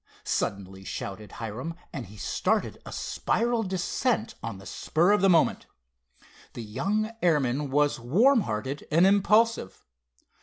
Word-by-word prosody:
suddenly 95 -1 -3
shouted 100 +2 -6
Hiram, 120 +9 -5 0.2
and 125 -7 -5
he 105 +3 -13
started - - -1
a - - -7
spiral 235 0 0
descent, 220 +4 -1
on 115 -3 -5
the 95 - -13
spur 170 - +1
of 205 -1 +3
the 195 - +5
moment. 165 -3 +3 0.9
The 120 - -6
young 195 - -1
airman 145 -4 +1
was 145 0 +2
warm 220 - +4
hearted 130 - -4
and 165 +4 +4
impulsive. 210 - +2
150 Hz, 130 wpm, -27 LUFS, -, 0.9 s, the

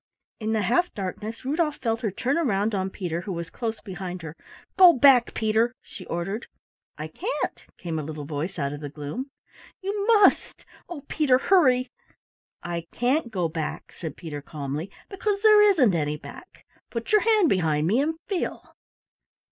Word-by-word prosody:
In 220 0 -1
the 215 -2 +1
half 350 - +2
darkness 210 +5 -5
Rudolf 300 +2 0
felt 225 -2 -2
her 220 - 0
turn 255 - -1
round 220 -9 +1
on 190 -1 -1
Peter, 175 -3 -4
who 195 - -6
was 170 -2 -5
close 225 -2 -4
behind 185 -3 -6
her. 160 -1 -7 0.4
"Go 365 -2 +9
back, 255 -3 +5
Peter," 225 +3 +1
she - - -11
ordered. 195 +7 -3 0.5
"I - - -5
can't," 450 +7 -3 0.2
came 165 -3 -4
a - - -4
little 150 -1 -6
voice 155 +6 -4
out 140 -2 -2
of 145 - -6
the 145 - -5
gloom. 150 - -6 0.5
"You 400 +1 -3
must 425 -4 +4 0.2
oh, 340 -5 -6
Peter, 280 -5 +3
hurry!" 260 -7 +3 0.7
"I 170 -1 -4
can't 250 +2 0
go 185 -6 -1
back," 160 -1 -5
said 160 -4 -7
Peter 150 -4 -6
calmly, 145 +4 -5 0.2
"because 400 +1 -2
there 425 -1 +8
isn't 335 - +5
any 150 -2 -1
back. 355 - -13 0.2
Put 230 -1 -5
your 425 -1 +5
hand 435 -6 +4
behind 160 - +1
me 210 +9 +2
and 320 +3 0
feel." 385 -4 -4
220 Hz, 170 wpm, -25 LUFS, -, 0.7 s, Go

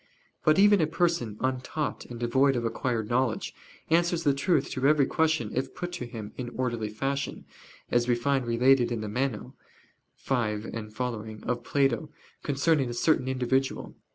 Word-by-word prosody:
But 155 0 +4
even 205 -1 +6
a 155 - +2
person 165 - 0
untaught 130 +4 -2
and 120 -1 -8
devoid 130 +3 +3
of 120 -1 -1
acquired 115 -1 -1
knowledge, 120 0 0 0.4
answers 170 0 +2
the 140 - +3
truth 140 +1 +1
to 130 +1 +1
every 150 -2 +5
question 160 -9 +1
if 130 +1 -3
put 175 -1 -4
to 175 -9 -5
him 110 -3 -7
in 125 -2 -4
orderly 120 -4 -1
fashion, 135 +6 -3 0.5
as 120 0 +2
we 120 - +3
find 130 +1 0
related 120 +1 +4
in 115 -2 -2
the 110 - -4
Meno 120 0 -2 0.7
(xv 110 -5 -1 0.2
seqq.) 110 -2 -5
of 120 0 -2
Plato, 140 +1 +1 0.3
concerning 140 -1 +1
a 120 - -4
certain 130 0 +2
individual. 130 +1 -1
130 Hz, 160 wpm, -28 LUFS, 120-140 Hz, 0.7 s, even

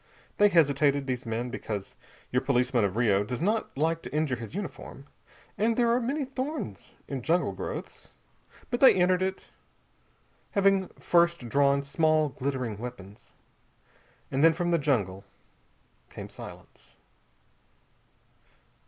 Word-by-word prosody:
They 205 0 +7
hesitated, 145 -4 +3
these 125 -2 -3
men, 120 +2 -3
because 105 -5 -5 0.4
your 125 - +2
policeman 125 -3 +1
of 100 -1 0
Rio 105 -4 +3
does 125 +3 -4
not 210 -1 -1
like 165 +3 +1
to - - -9
injure 150 -3 0
his 115 +5 -8
uniform, 185 -8 -7 0.5
and 225 +2 +2
there 235 -1 +3
are 240 - +3
many 275 +4 -1
thorns 260 - -5
in 135 -2 -4
jungle 170 +7 +1
growths. - - -7 0.6
But 240 - 0
they 270 - +8
entered 180 0 +3
it, 190 0 -3 1.0
having 195 -1 +3
first 170 -7 +2
drawn 140 +1 +3
small 155 +1 +2
glittering 130 -6 -3
weapons. 105 -4 -10 1.0
And 135 +2 +1
then 165 0 +7
from 175 +1 -1
the 170 - +3
jungle 100 -10 0 0.9
came - - -9
silence. - - -13
145 Hz, 130 wpm, -28 LUFS, 125-185 Hz, 1.0 s, they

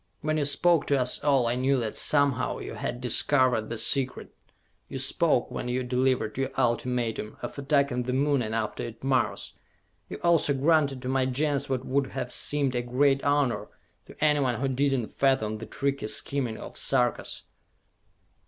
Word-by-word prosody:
When 155 0 -1
you 145 - +1
spoke 155 +3 +2
to 140 -1 +2
us 125 0 +1
all, 140 -4 +3
I 115 - +1
knew 130 +2 +1
that 110 -3 -3
somehow 140 -4 +2
you - - -7
had 120 - -4
discovered 125 -2 +2
the 115 - -4
secret! 130 +3 0 0.6
You - - -5
spoke, - - +1
when - - -4
you 125 +1 -1
delivered 125 -3 0
your 135 - 0
ultimatum, 120 -2 -1
of - - -5
attacking 140 -3 +1
the 125 +1 -3
Moon, 140 0 +2
and 110 -1 -3
after 110 -2 -3
it 115 0 -8
Mars! 135 -1 0 0.6
You - - -6
also 165 -4 +3
granted 140 -2 +2
to - - -4
my 130 0 +1
Gens 140 +2 -1
what 130 -1 -2
would 135 +1 0
have 125 - -3
seemed 140 -3 0
a 120 - 0
great 135 +3 +1
honor 145 -3 +1 0.4
to - - -13
anyone 140 -6 +2
who 135 - 0
did 135 0 +1
not 115 - -6
fathom 110 -6 +1
the 110 - -8
tricky 140 -1 -2
scheming 125 -1 -1
of - - -8
the - - -1
Sarkas! 125 -3 0
130 Hz, 180 wpm, -27 LUFS, 125-140 Hz, 0.6 s, all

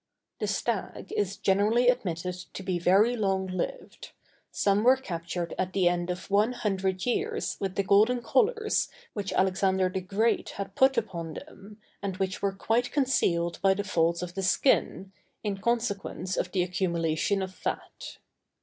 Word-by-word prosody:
The - - -1
stag - - -3
is 200 -1 -1
generally 210 +5 +2
admitted 180 -8 0
to 180 +1 -9
be 185 -2 -1
very 200 +8 +4
long 195 -4 0
lived; 185 -1 -5 0.4
some 200 +1 +1
were 255 +2 +7
captured 170 -7 -4
at 185 0 -1
the 185 -3 +3
end 175 0 0
of 180 +2 -5
one 210 +5 +3
hundred 190 -4 -1
years 430 - -1
with 195 -1 -3
the 200 - +1
golden 220 +6 +3
collars 435 - +1 0.2
which 200 -2 -3
Alexander 190 0 +2
the 185 +1 -3
Great 210 +5 0
had 200 -1 -5
put 265 +2 +4
upon 170 -8 -3
them, 205 +2 -11 0.2
and 195 -2 -3
which 190 -1 -2
were 200 - +1
quite 225 +5 0
concealed 175 - +1
by 195 0 +4
the 205 - -2
folds 170 -2 +1
of 175 -1 -6
the 195 - -3
skin, 190 -1 +1 0.3
in 205 -2 -2
consequence 200 -5 -1
of 180 - -2
the 185 -2 +1
accumulation 175 +1 0
of 190 0 -6
fat. - - -5
195 Hz, 160 wpm, -28 LUFS, 180-215 Hz, 0.4 s, were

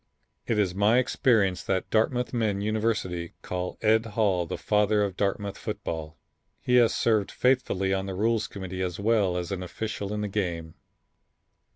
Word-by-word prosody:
It 115 - +1
is 100 -4 +1
my 105 +5 +3
experience 110 -7 +2
that 95 -2 -2
Dartmouth 120 +3 +1
men 110 -4 0
universally 105 -5 -1
call 90 0 -4
Ed 110 +1 +4
Hall 95 -6 +2
the - - -4
father 105 0 +2
of 100 -3 -2
Dartmouth 100 0 -2
football. 80 -1 -5 0.4
He 125 0 +2
has 120 -2 +5
served 110 -4 +2
faithfully 115 -7 +1
on 95 0 -1
the 95 - -4
Rules 110 +2 +1
Committee 95 -1 -6
as 90 -1 -3
well 100 -4 +2
as 90 0 -4
an 95 -2 -3
official 100 +2 -4
in 105 0 -2
the 105 - -1
game. 85 -6 -3
100 Hz, 165 wpm, -27 LUFS, 90-110 Hz, 0.4 s, has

